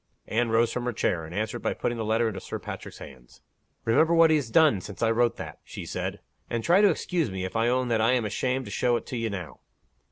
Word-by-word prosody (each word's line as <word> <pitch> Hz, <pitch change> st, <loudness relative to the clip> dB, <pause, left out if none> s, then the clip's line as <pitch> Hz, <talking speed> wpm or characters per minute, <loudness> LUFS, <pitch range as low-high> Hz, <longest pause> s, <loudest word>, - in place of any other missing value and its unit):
Anne 115 Hz, +1 st, 0 dB
rose 115 Hz, +1 st, +2 dB
from 125 Hz, -1 st, -3 dB
her 125 Hz, -, -1 dB
chair, 85 Hz, -6 st, -1 dB
and 80 Hz, +3 st, -9 dB
answered 110 Hz, +1 st, -2 dB
by -, -, -1 dB
putting 120 Hz, -, -2 dB
the 115 Hz, -, -3 dB
letter 110 Hz, +2 st, +1 dB
into 100 Hz, -3 st, -4 dB
Sir -, -, -6 dB
Patrick's -, -, -8 dB
hands. 65 Hz, -3 st, -14 dB, 0.4 s
"Remember 160 Hz, +9 st, +4 dB
what 165 Hz, -1 st, +6 dB
he -, -, +5 dB
has 140 Hz, -6 st, -1 dB
done, 145 Hz, -, +4 dB
since 105 Hz, +4 st, -6 dB
I 115 Hz, -, +3 dB
wrote 120 Hz, +1 st, +2 dB
that," -, -, -8 dB
she -, -, -8 dB
said. -, -, -4 dB, 0.3 s
"And 115 Hz, -1 st, -2 dB
try 180 Hz, +4 st, +5 dB
to 205 Hz, -, +6 dB
excuse 165 Hz, -4 st, -1 dB
me, 95 Hz, -1 st, -4 dB
if 95 Hz, -, -7 dB
I 115 Hz, +1 st, +2 dB
own 125 Hz, +1 st, +1 dB
that 115 Hz, -2 st, +2 dB
I 115 Hz, +3 st, +4 dB
am 125 Hz, -3 st, +1 dB
ashamed 130 Hz, +5 st, -1 dB
to -, -, -8 dB
show 120 Hz, -1 st, +1 dB
it -, -, -3 dB
to -, -, -6 dB
you 115 Hz, -1 st, -1 dB
now." 95 Hz, -5 st, -6 dB
115 Hz, 260 wpm, -27 LUFS, 110-125 Hz, 0.4 s, what